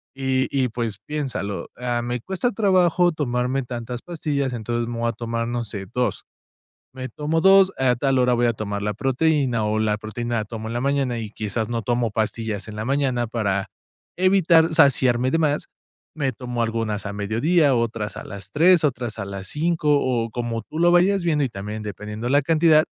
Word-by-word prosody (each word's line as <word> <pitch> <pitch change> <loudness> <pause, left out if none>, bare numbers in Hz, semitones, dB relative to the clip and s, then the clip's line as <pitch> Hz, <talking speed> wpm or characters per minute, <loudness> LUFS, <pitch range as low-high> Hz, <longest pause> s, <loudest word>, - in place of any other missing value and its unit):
y 130 -1 0
y, 130 -2 +1
pues 115 -3 -3
piénsalo: 135 -9 -3
"Ah, 120 -1 -1
me 120 +1 -2
cuesta 190 - -1
trabajo 180 -4 +3
tomarme 130 -2 -1
tantas 120 0 -6
pastillas, 145 -6 -2
entonces, 120 0 -2
me 120 -1 -4
voy 115 0 +1
a - - -2
tomar, 115 -1 -3
no 120 0 -2
sé, 100 -2 -5
2, 125 -5 -1 0.7
me 130 0 -5
tomo 150 +4 -1
2 195 0 +6
a 130 -2 +3
tal 135 +1 +1
hora 125 -1 +3
voy 120 0 +2
a 120 - +2
tomar 100 -1 -4
la 105 0 -1
proteína, 135 -1 +1
o 105 +1 0
la 105 -1 +1
proteína 120 +3 -4
la 110 - -1
tomo 110 0 -6
en - - -5
la 120 - -1
mañana, 135 -2 0
y 110 -2 -5
quizás 110 +1 -3
no 115 -1 -2
tomo 120 0 0
pastillas 110 -2 -2
en 105 - -8
la 110 - -3
mañana, 130 -3 +1
para 100 -4 -1 0.5
evitar 175 -3 +4
saciarme 130 -4 +4
de 165 - +1
más, 150 -2 0 0.5
me 140 -4 0
tomo 120 0 -4
algunas 115 -2 -2
a 100 - -4
mediodía, 135 - +2
otras 115 -3 -2
a - - -7
las 100 0 -9
3, 170 +2 +5
otras 120 -5 -1
a - - -3
las 100 -1 -6
5," 160 - -1
o 120 -3 0
como 115 -1 -3
tú 155 - -8
lo 175 0 +5
vayas 185 +2 +4
viendo, 150 -4 +2
y - - -1
también 105 +1 -6
dependiendo 105 +3 -5
la 145 +2 +4
cantidad, 155 +1 +4
120 Hz, 195 wpm, -23 LUFS, 110-150 Hz, 0.7 s, 2